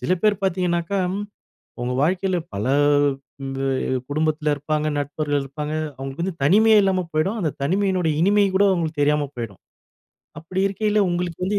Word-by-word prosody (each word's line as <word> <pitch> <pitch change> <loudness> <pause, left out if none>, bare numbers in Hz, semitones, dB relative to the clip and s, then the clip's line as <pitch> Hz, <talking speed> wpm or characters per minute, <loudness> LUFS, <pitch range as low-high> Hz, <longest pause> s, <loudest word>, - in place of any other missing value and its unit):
சில 185 - 0
பேர் 210 -2 +2
பாத்தீங்கணாக்கா, 180 0 0 0.8
உங்க 125 +1 -2
வாழ்க்கையில 185 +2 +1 0.2
பல 100 +1 -3 0.8
இந்த 135 0 -5 0.5
குடும்பத்தில 155 0 0
இருப்பாங்க, 150 +1 -2
நண்பர்கள் 145 0 -1
இருப்பாங்க. 150 +2 -5 0.2
அவுங்களுக்கு 135 +5 -5
வந்து 180 -3 -4
தனிமையே 215 +8 +5
இல்லாம 185 -2 +1
போயிடும், 190 +9 0
அந்த 155 - 0
தனிமையினுடைய 185 0 +1
இனிமை 205 +2 +4
கூட 200 - +5
அவுங்களுக்கு 160 -4 -1
தெரியாம 145 0 +2
போயிடும். 115 -5 -7 0.8
அப்புடி 185 +4 -4
இருக்கையில, 210 +2 0
உங்களுக்கு 175 -1 -2
வந்து 200 +2 0
170 Hz, 140 wpm, -22 LUFS, 150-190 Hz, 0.8 s, தனிமையே